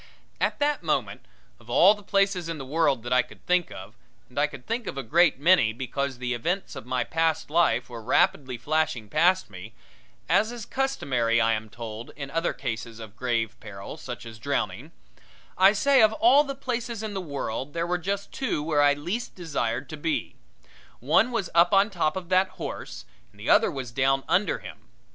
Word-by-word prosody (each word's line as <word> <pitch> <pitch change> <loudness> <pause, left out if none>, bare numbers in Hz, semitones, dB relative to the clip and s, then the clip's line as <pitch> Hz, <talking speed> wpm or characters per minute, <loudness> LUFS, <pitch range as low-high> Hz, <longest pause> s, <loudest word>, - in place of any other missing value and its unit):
At - - 0
that 290 0 0
moment, 130 - -2 0.3
of 115 - -19
all 175 +11 +6
the 210 - -12
places 195 -3 +1
in 165 - -3
the 135 - -7
world 140 -4 +1
that 120 +1 -1
I 125 - +5
could - - -15
think 180 -1 +1
of 95 - -10 0.4
and 125 - -4
I 150 - +3
could 135 -4 -12
think 230 0 -3
of - - -5
a 135 - -3
great 165 +6 +3
many 145 -8 +4
because 130 +2 -3
the 125 0 -2
events 175 +10 -2
of 135 -3 -9
my 125 -1 0
past 160 +1 -1
life 155 -8 +2
were 120 -2 -8
rapidly 130 +3 +1
flashing 150 -4 -1
past 185 - +2
me 95 +5 -10 0.5
as 220 - +3
is 240 -3 -7
customary, 130 - 0
I 115 0 +3
am 110 0 -4
told, 115 +1 -8
in 140 -1 -7
other 165 +2 0
cases 115 0 -5
of 110 -2 -10
grave 115 -3 -1
peril, 100 +4 -9
such 125 -6 -8
as 110 -2 -10
drowning - - -3 0.6
I 190 +1 +6
say 265 +5 +4
of 220 0 +5
all 300 -1 +5
the 275 -2 -5
places 235 -4 -4
in 215 -1 -4
the 190 - -3
world 140 -4 -4
there 170 0 -1
were 175 +1 -1
just 200 +3 -3
two 260 - -2
where 150 -2 +2
I 145 0 +5
least 175 +11 -4
desired 140 -7 -2
to 155 - -6
be 155 +1 -2 0.7
one 155 - +3
was 220 -7 -2
up 170 +4 +5
on 200 +2 +4
top 165 -5 0
of 180 -2 -7
that 185 +1 +4
horse - - -6 0.3
and 105 - -23
the 105 - 0
other - - +5
was 130 -4 -6
down 135 +2 +1
under 200 +3 +2
him. - - -12
150 Hz, 200 wpm, -26 LUFS, 120-185 Hz, 0.7 s, all